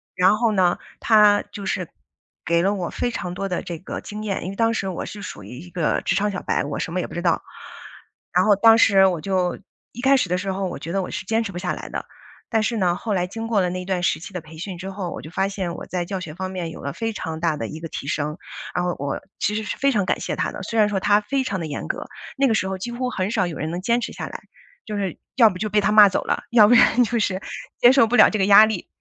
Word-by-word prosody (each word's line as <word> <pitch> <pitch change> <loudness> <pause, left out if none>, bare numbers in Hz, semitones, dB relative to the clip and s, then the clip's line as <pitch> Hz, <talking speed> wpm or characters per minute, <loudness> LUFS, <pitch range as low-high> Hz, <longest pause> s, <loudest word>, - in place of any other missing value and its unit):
然 185 +3 +4
后 235 -2 +2
呢， 185 -3 +2 0.2
他 210 -2 +5
就 200 -2 -7
是， 185 -3 -2 0.6
给 170 +1 +2
了 200 +2 +2
我 180 -4 -3
非 245 - -2
常 180 -6 -4
多 195 +2 -3
的 180 -2 -2
这 170 -2 -6
个 - - -6
经 210 +1 -7
验， 200 -3 -2
因 185 - -4
为 195 - -6
当 230 +1 +2
时 195 -3 -2
我 180 - -4
是 205 - -8
属 105 - -8
于 125 +6 -9
一 180 - -11
个 170 -3 0
职 175 - 0
场 205 +1 +1
小 185 - -4
白， - - 0
我 145 - -4
什 - - -3
么 185 - 0
也 - - -2
不 - - -12
知 175 - -3
道。 170 -2 +1 0.9
然 - - +4
后 205 -2 +5
当 225 +2 +6
时 195 -4 +6
我 175 -4 -1
就 185 -1 -1 0.3
一 245 - -7
开 270 +1 +5
始 185 - 0
的 180 - +1
时 190 +1 -2
候 195 0 -2
我 - - -6
觉 165 - -6
得 195 - +1
我 - - -6
是 190 - -5
坚 225 +3 +1
持 200 - -5
不 175 - -7
下 - - -2
来 - - -7
的。 - - -5 0.4
但 220 -2 +1
是 235 - 0
呢， 175 -3 +2
后 215 +2 -3
来 180 -1 0
经 225 +4 -5
过 215 -4 +2
了 180 - +1
那 180 0 -4
段 185 -2 -1
时 - - +1
期 185 - -10
的 180 - -4
培 160 +1 -14
训 185 +1 -6
之 190 +2 -6
后， 190 -3 -5
我 - - -6
就 155 - -10
发 195 +2 0
现 190 -4 -4
我 - - -7
在 180 -1 -2
教 190 +1 -4
学 160 -4 -7
方 185 +2 -5
面 175 -3 -4
有 - - -10
了 140 - -4
非 225 -1 -3
常 160 -5 -5
大 165 -2 +1
的 115 - -4
一 155 - -8
个 165 - -6
提 140 - -6
升。 150 +2 -2 0.4
然 180 - +1
后 175 - 0
我 140 -1 -3 0.2
其 210 - 0
实 220 - -2
是 - - -4
非 275 - +2
常 205 -6 +1
感 - - 0
谢 - - -3
他 - - -1
的， - - -7
虽 230 - -4
然 210 -1 +5
说 195 -2 0
他 205 +1 +3
非 265 +5 -1
常 190 -8 -2
地 160 - -3
严 145 - -5
格。 - - -4 0.3
那 275 - +3
个 - - +3
时 190 - 0
候 190 - -3
几 240 +6 -5
乎 250 +1 -2
很 190 -2 -2
少 190 -6 +1
有 170 - -6
人 160 +2 -3
能 175 - -3
坚 235 +4 +1
持 - - -4
下 - - -5
来， - - -7 0.5
就 210 - -4
是 195 -3 -3 0.2
要 230 -4 +7
不 185 - -6
就 215 +1 -2
被 210 - +3
他 200 - +1
骂 210 -2 +9
走 - - -1
了， - - -1
要 220 -3 +7
不 235 - +5
然 245 +2 +5
就 235 +1 -1
是 190 -2 -1 0.4
接 245 - +7
受 270 -4 +6
不 245 - 0
了 215 - +8
这 215 - -1
个 - - +3
压 205 +2 +9
力， 215 -5 -4
195 Hz, 325 characters per minute, -22 LUFS, 175-215 Hz, 0.9 s, 骂